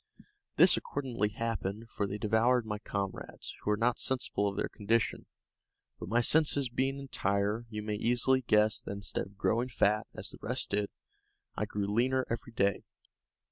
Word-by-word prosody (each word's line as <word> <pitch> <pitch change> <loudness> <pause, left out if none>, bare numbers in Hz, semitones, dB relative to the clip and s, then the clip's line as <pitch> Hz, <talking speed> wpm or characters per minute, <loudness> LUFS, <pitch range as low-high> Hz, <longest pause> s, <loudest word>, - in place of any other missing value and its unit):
This - - +7
accordingly 120 -7 -2
happened, 110 0 -4
for 100 - -2
they 100 - -4
devoured 110 +3 +2
my 105 -1 -4
comrades, 100 -2 -4
who - - -3
were 105 - +2
not 120 +2 +1
sensible 125 -5 +2
of 100 - -3
their - - -1
condition; 110 +2 -1 0.7
but - - -7
my 120 +2 +3
senses 145 -1 +4
being 135 +3 -1
entire, 105 -4 -1
you 105 -1 -5
may 105 0 -3
easily 125 +4 +2
guess 105 -3 +3
that - - -6
instead 100 -1 -2
of 100 0 -20
growing 120 +5 0
fat, 105 -2 +1
as - - -1
the - - -10
rest - - 0
did, 100 0 0 0.7
I - - -1
grew 105 -1 -3
leaner 125 +5 +1
every 115 0 -4
day. 100 -2 +1
110 Hz, 170 wpm, -31 LUFS, 105-120 Hz, 0.7 s, This